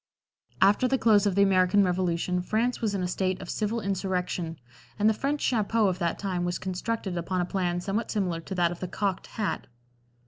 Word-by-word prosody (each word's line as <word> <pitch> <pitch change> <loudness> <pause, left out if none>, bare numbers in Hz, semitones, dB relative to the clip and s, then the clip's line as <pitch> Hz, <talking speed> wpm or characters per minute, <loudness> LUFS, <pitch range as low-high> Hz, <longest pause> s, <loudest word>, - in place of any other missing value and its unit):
After 205 +6 +4
the 265 +1 +2
close 215 -4 +4
of 195 - 0
the 200 - +5
American 190 +1 +4
Revolution 180 -1 0
France 230 +7 0
was 215 -3 0
in 190 - -1
a - - 0
state 185 +1 -1
of 185 - -6
civil 220 +2 -1
insurrection, 180 -4 -2 0.4
and 210 - +3
the 220 - +5
French 280 +6 -2
"chapeau" 225 -1 +2
of 185 - -3
that 170 -2 0
time 185 -3 -2
was 175 0 -1
constructed 190 +1 -3
upon 180 +2 -2
a 175 - +1
plan 175 -2 -1
somewhat 205 +5 -2
similar 180 -6 -1
to 190 - -6
that 175 -1 +2
of 175 - -7
the 185 - -4
"cocked" 195 +1 -2
hat. 215 -2 -2
190 Hz, 205 wpm, -27 LUFS, 180-210 Hz, 0.4 s, the